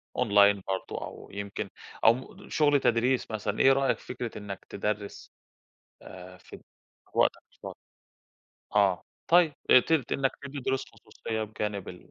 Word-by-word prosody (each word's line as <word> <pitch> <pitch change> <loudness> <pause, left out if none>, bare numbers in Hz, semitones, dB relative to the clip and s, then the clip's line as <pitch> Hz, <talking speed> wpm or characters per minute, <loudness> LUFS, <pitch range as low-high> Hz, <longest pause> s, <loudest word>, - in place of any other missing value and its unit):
أونلاين 100 -4 +4
برضه 95 0 -3
أو - - -11
يمكن 100 0 -5 0.4
أو 115 - +8
مم 130 +2 -10
شغل 145 -2 +3
تدريس 120 0 +1
مثلًا، 105 -1 -3
إيه 135 - +6
رأيك 135 -1 +1
في - - -17
فكرة 120 -3 -5
إنّك 100 -2 -8
تدرّس؟ 105 0 -4 0.7
آآ، 90 0 -11
فد - - -13 0.5
في - - -10
وقتك - - +3
الفاضي. - - -10 1.0
آه، 95 -4 +3 0.3
طيب 170 -4 +5 0.2
ابت 135 0 +4
إنّك 135 -1 +1
تدّي 140 0 -7
دروس 130 +1 -1
خصوصية 110 -1 -6
بجانب 105 -2 -4
ال 90 - -12
110 Hz, 145 wpm, -28 LUFS, 100-135 Hz, 1.0 s, أو